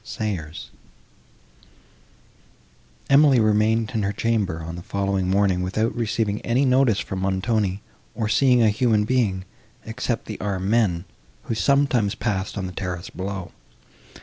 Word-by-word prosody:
SAYERS 95 -10 -5 2.4
Emily 140 -2 +5
remained 110 +1 +2
in 110 - 0
her 100 0 0
chamber, 100 -7 -1
on 80 +1 -6
the 85 - -7
following 100 0 -1
morning, 95 -2 +2
without 110 +5 -1
receiving 110 -2 -1
any 125 +4 +1
notice 130 -4 +3
from 95 - -4
Montoni, 95 +1 -1 0.3
or 110 - -1
seeing 125 +1 +4
a 110 - +5
human 110 -1 +2
being, 105 -7 0 0.4
except 115 +1 -3
the 105 - -7
armed 95 0 -2
men, 100 -7 +2 0.4
who - - -3
sometimes 125 -4 +2
passed 100 -2 -2
on 95 - -2
the 90 - -5
terrace 90 -2 -5
below. 95 -1 -5
105 Hz, 135 wpm, -23 LUFS, 95-115 Hz, 2.4 s, Emily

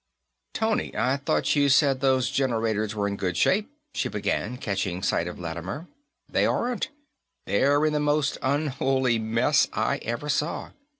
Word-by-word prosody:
"Tony, 220 -1 0
I 130 +2 +2
thought 140 +2 +1
you 145 -1 +3
said 135 -1 +4
those 130 -4 +2
generators 110 -5 0
were 100 -1 0
in 100 0 -3
good 90 -3 -2
shape," 210 +4 +2 0.2
she - - -1
began, 105 +3 -2
catching 95 -5 -2
sight 85 -3 +1
of 90 - -7
Lattimer. 90 - -5 0.4
"They - - +1
aren't. 245 0 -1 0.6
They're 145 +8 +3
in 155 - +1
the 150 - +1
most 150 -1 +1
unholy 135 -3 +1
mess 110 +1 +2
I - - 0
ever 120 +6 -4
saw. 150 +2 -1
130 Hz, 155 wpm, -26 LUFS, 105-145 Hz, 0.6 s, said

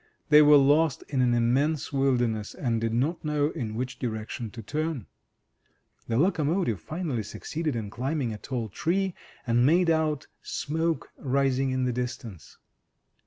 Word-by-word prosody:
They 150 0 +8
were 150 0 +8
lost 145 +2 +3
in 135 -3 +1
an 120 -1 +3
immense 135 +6 +1
wilderness, 120 -6 0
and 115 -4 -1
did 115 0 0
not 140 +9 0
know 150 0 +1
in 110 -3 -4
which 125 +2 -4
direction 110 -1 -4
to 115 +1 -9
turn. 155 - -3 1.0
The 115 - 0
locomotive 160 - +1
finally 155 -8 -3
succeeded 155 +7 -4
in 105 -3 -4
climbing 130 +1 -2
a 105 - -8
tall 120 -3 -4
tree, 185 - 0 0.3
and 120 0 +3
made 170 +5 +4
out 155 -3 0 0.2
smoke 160 0 -2
rising 135 0 +1
in 130 0 0
the 125 - 0
distance. 120 - -6
135 Hz, 150 wpm, -27 LUFS, 120-155 Hz, 1.0 s, They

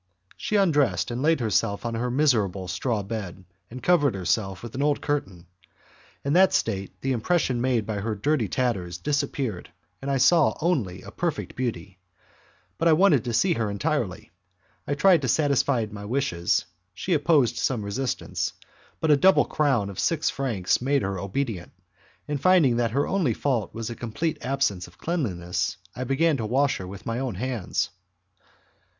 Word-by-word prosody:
She 215 - -3
undressed, 145 - +2
laid 140 +5 +1
herself 105 -1 0
on 115 - -2
her 120 +2 -1
miserable 110 -9 +1
straw 105 +3 -1
bed, 95 -3 -6 0.2
and 125 +2 -9
covered 145 - +3
herself 95 +1 -1
with 120 - -8
an 135 - -3
old 145 0 +2
curtain. 95 - -3 0.8
In 140 - +1
that 185 +1 +5
state, 95 -4 -2
the 135 - -1
impression 130 0 +1
made 125 -4 +1
by 110 -2 -3
her 110 +2 -2
dirty 125 +2 0
tatters 95 -7 -1
disappeared, 140 -4 -2 0.3
and 140 - -4
I - - +1 0.2
only 155 - +1
saw - - -15
a - - -8
perfect - - -3
beauty. 100 -7 -4 0.8
But 165 - +2
I 165 - +6
wanted 160 - +4
to 120 - -2
see 175 - +3
her 115 -7 -1
entirely. 100 -4 -2 0.6
I 145 - 0
tried 175 +2 +5
to 130 - -1
satisfy 140 -3 +2
my 100 0 -8
wishes, 105 -8 0 0.3
she 180 - -1
opposed 145 -6 +3
some 115 -6 -1
resistance, 125 +5 -2 0.5
but 160 - +3
a - - +8
double 190 +6 +5
crown 135 -9 +1
of 95 - -8
six 165 -2 +1
francs 115 -10 0
made 140 0 +1
her 95 -1 -2
obedient, 100 -2 -3 0.5
and 145 -2 -3
finding 170 -10 +4
that 120 -1 +1
her 135 +5 0
only 170 - +1
fault 125 -8 -1
was 115 0 -4
a - - -5
complete 120 +9 -3
absence 125 -10 0
of 90 - -19
cleanliness, 95 - -2 0.2
I 130 - -4
began 145 +4 +2
to 110 - -3
wash 135 +5 +2
her 95 - -7
with 100 +1 -10
my 115 +1 -2
own 130 -2 -3
hands. 125 -6 -2
125 Hz, 170 wpm, -25 LUFS, 100-145 Hz, 0.8 s, a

